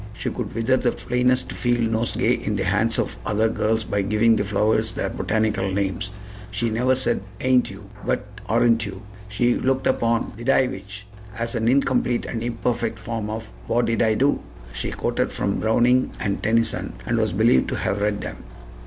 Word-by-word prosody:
She - - -4
could - - -5
wither 115 +3 +2
the 125 -1 +1
plainest 125 +1 0
field 120 -2 0
nosegay 115 +1 +1
in 105 - -1
the 95 - 0
hands 105 +5 +1
of - - -2
other 105 - +2
girls 110 0 0
by 100 -1 -1
giving 110 +3 +3
the 105 - +1
flowers 105 +2 +1
their - - -2
botanical 110 -3 0
names. 95 0 -1 0.4
She 110 +3 -1
never 125 +4 +2
said 125 -4 0 0.2
"Ain't 130 -1 +3
you?" - - -11 0.2
but - - -1 0.2
"Aren't 115 0 +3
you?" 95 -2 -7 0.3
She 120 +3 +2
looked 130 +1 0
upon 115 -2 +1
"Did 120 +3 -4
I 130 - +5
which?" 100 -1 -7 0.3
as 115 0 -2
an 115 -2 0
incomplete 125 -2 +2
and 115 - -4
imperfect 115 -1 -1
form 110 -1 -4
of 110 0 -5 0.2
"What 120 0 +2
did 115 -1 0
I 110 -1 +3
do?" 140 +5 +2 0.3
She - - -3
quoted - - -1
from 100 -1 -1
Browning 120 +3 +3
and 100 -1 -1
Tennyson, 115 +1 +1
and - - 0
was - - +1
believed 65 - +3
to - - -2
have 100 - -1
read 105 0 0
them. - - -5
115 Hz, 185 wpm, -23 LUFS, 105-120 Hz, 0.4 s, I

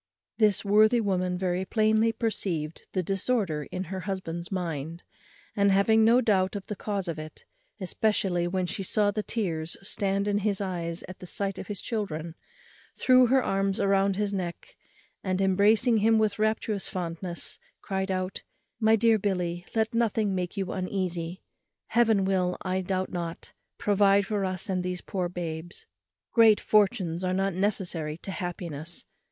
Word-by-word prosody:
This 210 -2 +4
worthy 215 +4 +5
woman 185 -4 0
very 180 0 -1
plainly 220 +2 +2
perceived 185 -9 -3
the 185 - 0
disorder 195 - 0
in 185 - -3
her 190 +1 -5
husband's 180 -3 -5
mind; 165 -3 -4 0.5
and, 200 -1 +4
having 220 +3 +4
no 235 +3 +5
doubt 190 -4 +2
of 200 - -5
the 210 - -5
cause 200 -2 -3
of 165 -2 -3
it, 155 0 -10 0.3
especially 185 -2 0
when 185 +1 -1
she 185 - -4
saw 205 +2 +2
the 215 - -2
tears 170 -8 -3
stand 200 0 0
in 205 0 +1
his 205 -1 0
eyes 175 -3 -3
at 185 - -10
the 180 - -8
sight 195 +1 -2
of - - -7
his 205 -2 -5
children, 170 -8 -3 0.6
threw 255 -1 +5
her 260 +1 +3
arms 195 0 0
round 195 -1 +2
his 205 0 -1
neck, 180 -3 -5 0.5
and, 185 -1 -1
embracing 205 +5 +4
him 220 +1 +4
with 215 -1 +1
rapturous 215 -2 0
fondness, 170 0 -5 0.2
cried 190 0 -2
out, 185 0 -2 0.4
"My 220 -1 +5
dear 225 0 +4
Billy, 180 -3 -2
let 220 0 +1
nothing 220 -3 +1
make 180 +2 -3
you 190 -2 -2
uneasy. 185 -2 -3 0.5
Heaven 220 -4 +3
will, 180 -2 +1
I 185 0 -1
doubt 185 0 -2
not, 170 -2 -5 0.2
provide 200 -1 +3
for 200 -1 -1
us 185 0 -3
and 185 -2 0
these 180 0 -3
poor 180 -2 -3
babes. 170 -1 -6 0.5
Great 225 -3 +6
fortunes 190 -5 +2
are 185 0 0
not 195 0 0
necessary 175 -5 -1
to 195 - -5
happiness. 175 -3 -5
195 Hz, 160 wpm, -27 LUFS, 180-210 Hz, 0.6 s, Great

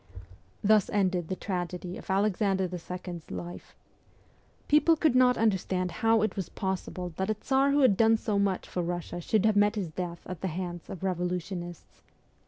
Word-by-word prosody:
Thus 210 -1 +4
ended 185 -4 +1
the 185 - -2
tragedy 180 -2 -4
of - - -11
Alexander 195 -1 +1
the 180 0 -5
Second's 180 -1 -7
life. 175 0 -7 0.9
People 300 +2 +5
could 310 -3 +2
not 250 -1 +5
understand 190 -4 0
how 225 -1 +4
it 215 - -1
was 190 -4 -4
possible 185 -2 -4
that 190 +1 -1
a 215 - +1
Tsar 270 +5 +2
who 285 +1 +3
had 235 -8 +5
done 225 0 +5
so 210 -2 -1
much 195 -2 0
for 180 - -2
Russia 175 0 -4
should 215 +4 +1
have 215 -1 +3
met 205 +1 +4
his 195 -6 -2
death 175 0 -5
at 180 -2 -7
the 190 - -1
hands 175 0 -5
of 190 - -7
revolutionists. 180 -1 -4
190 Hz, 180 wpm, -29 LUFS, 180-215 Hz, 0.9 s, People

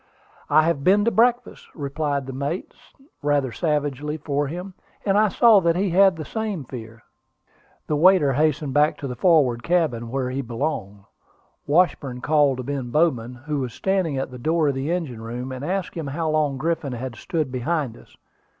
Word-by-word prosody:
"I 155 +2 +5
have 155 -4 0
been 205 +5 +4
to 235 - +3
breakfast," 245 +2 +1
replied 145 -1 -2
the 135 - -7
mate, 140 +7 -4 0.5
rather 145 -3 +1
savagely 150 -1 -1
for 145 -1 -1
him; 180 +5 -6 0.3
and 195 -1 +2
I 215 +1 +5
saw 220 0 +5
that 170 -2 +2
he 190 0 0
had 190 +1 +5
the 155 -2 -6
same 215 -6 -3
fear. 115 -3 -10 0.8
The 150 - -1
waiter 165 -3 +5
hastened 150 -1 0
back 150 +2 +3
to 140 - -5
the 125 - -5
forward 140 -8 +3
cabin, 145 -9 0
where 130 0 -2
he 135 +2 -2
belonged. 115 -5 -4 0.7
Washburn 145 -5 +1
called 145 -2 +3
to 130 - -4
Ben 135 -2 -4
Bowman, 125 -5 +1
who 150 -2 -1
was 125 -3 -4
standing 190 -7 0
at 130 0 -3
the 125 - -9
door 160 +3 +1
of - - 0
the 135 +3 -3
engine 155 -11 -3
room, 120 +3 -5
and 130 +1 -6
asked 185 +4 -2
him 160 -4 -5
how 155 +3 -2
long 150 -3 +1
Griffin 155 -2 -2
had 125 0 -5
stood 155 -5 -3
behind 130 0 -2
us. - - -18
145 Hz, 185 wpm, -23 LUFS, 130-170 Hz, 0.8 s, I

